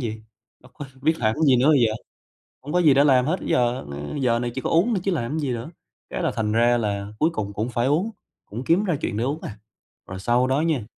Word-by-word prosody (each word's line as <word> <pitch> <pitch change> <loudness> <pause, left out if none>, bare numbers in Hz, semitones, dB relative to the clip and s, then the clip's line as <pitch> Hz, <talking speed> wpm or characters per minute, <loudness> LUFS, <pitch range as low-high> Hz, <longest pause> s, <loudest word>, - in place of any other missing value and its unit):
gì? 110 0 -9 0.4
Bất 125 0 -19
quá 145 0 -9
biết 160 +2 +2
làm 110 -2 +1
cái 160 - -3
gì 130 -2 +5
nữa 130 +5 +3
bây 145 -4 +5
giờ? 110 - -1 0.7
Hông 150 +4 -6
có 180 - +3
gì 150 -5 +6
để 140 +2 +5
làm 130 -3 +4
hết 170 +6 0
giờ 125 -3 0 0.4
giờ 120 -2 +2
này 120 0 -3
chỉ 130 - -3
có - - -2
uống 170 +8 +3
thôi 195 - 0
chứ 195 - 0
làm 125 -6 -2
cái 160 - -2
gì 145 -4 -2
nữa, 120 +5 -5 0.4
cái - - -4
là - - +1
thành 105 -1 -1
ra 120 +2 +3
là 100 -3 -2
cuối 160 - +3
cùng 100 -2 -4
cũng 110 +4 -2
phải 120 0 -1
uống, 170 +10 +1 0.4
cũng 115 +5 -7
kiếm 170 +9 +2
ra 180 -6 0
chuyện 110 - -2
để 115 - 0
uống 145 +5 -2
à. 105 - -7 0.5
Rồi 95 - -6
sau 120 +6 +2
đó 135 +3 +1
nha, 155 -9 0
125 Hz, 270 wpm, -23 LUFS, 115-155 Hz, 0.7 s, gì